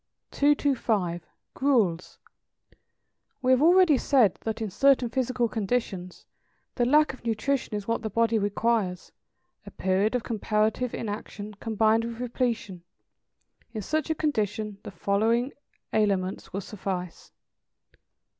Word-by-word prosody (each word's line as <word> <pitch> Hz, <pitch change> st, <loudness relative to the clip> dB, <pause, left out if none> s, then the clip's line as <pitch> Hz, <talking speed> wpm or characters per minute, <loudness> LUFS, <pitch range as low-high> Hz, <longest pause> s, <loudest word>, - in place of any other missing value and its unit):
225. 230 Hz, -, +1 dB, 0.3 s
=Gruels.= 220 Hz, -11 st, +1 dB, 1.3 s
We 255 Hz, -, +3 dB
have 260 Hz, +1 st, +4 dB
already 340 Hz, -3 st, +5 dB
said 245 Hz, -9 st, +4 dB
that 220 Hz, 0 st, -3 dB
in 220 Hz, -3 st, -3 dB
certain 260 Hz, +2 st, +3 dB
physical 255 Hz, -1 st, 0 dB
conditions 200 Hz, -5 st, -3 dB, 0.5 s
the 240 Hz, -, +1 dB
lack 300 Hz, +3 st, +4 dB
of 260 Hz, -, -14 dB
nutrition 230 Hz, +1 st, -1 dB
is 205 Hz, -1 st, -5 dB
what 230 Hz, 0 st, 0 dB
the 220 Hz, -, -3 dB
body 230 Hz, +1 st, +2 dB
requires, 205 Hz, -2 st, -1 dB, 0.5 s
a -, -, -10 dB
period 195 Hz, +5 st, 0 dB
of 245 Hz, -, -1 dB
comparative 220 Hz, +2 st, 0 dB
inaction, 210 Hz, -1 st, -6 dB
combined 220 Hz, +1 st, +1 dB
with 230 Hz, 0 st, -6 dB
repletion; 235 Hz, -6 st, -2 dB, 0.9 s
in 215 Hz, -3 st, -4 dB
such 310 Hz, -, -1 dB
a 320 Hz, -, +1 dB
condition 215 Hz, -8 st, -2 dB
the -, -, -8 dB
following 220 Hz, +7 st, 0 dB, 0.4 s
aliments 195 Hz, -3 st, 0 dB
will 195 Hz, -, -3 dB
suffice. 185 Hz, -3 st, -6 dB
225 Hz, 120 wpm, -27 LUFS, 200-250 Hz, 1.3 s, already